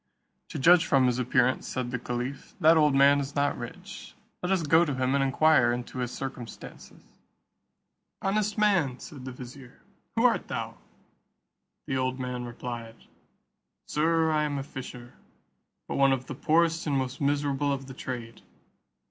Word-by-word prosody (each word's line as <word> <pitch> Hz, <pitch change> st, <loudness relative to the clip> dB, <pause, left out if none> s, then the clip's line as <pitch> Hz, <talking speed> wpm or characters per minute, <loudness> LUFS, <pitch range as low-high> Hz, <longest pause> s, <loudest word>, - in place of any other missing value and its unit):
"To -, -, -6 dB
judge 170 Hz, +4 st, +5 dB
from 135 Hz, -3 st, +4 dB
his 125 Hz, 0 st, +1 dB
appearance," 125 Hz, 0 st, +1 dB
said 125 Hz, -1 st, -3 dB
the 125 Hz, -, -2 dB
caliph, 125 Hz, +3 st, -5 dB
"that 165 Hz, -1 st, +6 dB
old 150 Hz, -3 st, +4 dB
man 140 Hz, +1 st, +6 dB
is 140 Hz, 0 st, -5 dB
not 145 Hz, 0 st, +1 dB
rich; 120 Hz, -1 st, -9 dB, 0.3 s
let 180 Hz, -, -2 dB
us 190 Hz, -3 st, +2 dB
go 160 Hz, +3 st, +5 dB
to 145 Hz, -5 st, -2 dB
him 130 Hz, 0 st, 0 dB
and 140 Hz, 0 st, +2 dB
inquire 135 Hz, -2 st, +4 dB
into 120 Hz, +1 st, -5 dB
his 125 Hz, -1 st, -1 dB
circumstances." 130 Hz, -3 st, -8 dB, 1.2 s
"Honest 210 Hz, +2 st, 0 dB
man," 190 Hz, -12 st, +2 dB
said 135 Hz, -2 st, -10 dB
the 130 Hz, -, -5 dB
vizier, 125 Hz, +1 st, -11 dB, 0.4 s
"who -, -, +2 dB
art -, -, +2 dB
thou?" -, -, -5 dB, 1.1 s
The 135 Hz, -, -2 dB
old 130 Hz, 0 st, -1 dB
man 125 Hz, -1 st, -4 dB
replied, 120 Hz, -1 st, -7 dB, 0.9 s
"Sir, 160 Hz, +1 st, +1 dB
I 155 Hz, -1 st, +2 dB
am 145 Hz, -1 st, -2 dB
a 135 Hz, -, -3 dB
fisher, 125 Hz, -3 st, -9 dB, 0.7 s
but -, -, -3 dB
one 135 Hz, -1 st, +5 dB
of 130 Hz, -1 st, -3 dB
the -, -, -6 dB
poorest 165 Hz, +4 st, +1 dB
and 140 Hz, -2 st, +1 dB
most 130 Hz, 0 st, -3 dB
miserable 145 Hz, 0 st, +1 dB
of 135 Hz, -1 st, -3 dB
the 130 Hz, -, -9 dB
trade. 120 Hz, -3 st, -7 dB
135 Hz, 165 wpm, -27 LUFS, 125-150 Hz, 1.2 s, that